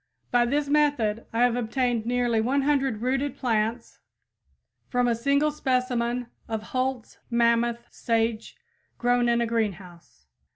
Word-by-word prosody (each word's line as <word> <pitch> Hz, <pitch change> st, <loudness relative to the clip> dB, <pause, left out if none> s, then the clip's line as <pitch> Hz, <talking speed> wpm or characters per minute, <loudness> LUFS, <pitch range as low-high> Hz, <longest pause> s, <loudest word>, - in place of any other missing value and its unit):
By 240 Hz, 0 st, +3 dB
this 285 Hz, +3 st, 0 dB
method 280 Hz, -7 st, +1 dB
I 230 Hz, +2 st, +2 dB
have 245 Hz, -1 st, +3 dB
obtained 240 Hz, -1 st, -1 dB
nearly 240 Hz, -2 st, +1 dB
100 270 Hz, -2 st, +1 dB
rooted 270 Hz, +2 st, -1 dB
plants 230 Hz, -2 st, -1 dB, 0.9 s
from 245 Hz, -1 st, +1 dB
a 240 Hz, -, +3 dB
single 280 Hz, +6 st, +1 dB
specimen 250 Hz, -3 st, -1 dB, 0.2 s
of 220 Hz, -2 st, -3 dB
Holt's 255 Hz, -2 st, -2 dB
Mammoth 235 Hz, 0 st, +1 dB
sage 225 Hz, -1 st, -1 dB, 0.4 s
grown 245 Hz, 0 st, +2 dB
in 235 Hz, 0 st, +2 dB
a -, -, +2 dB
greenhouse. 180 Hz, -, -4 dB
240 Hz, 125 wpm, -26 LUFS, 230-255 Hz, 0.9 s, By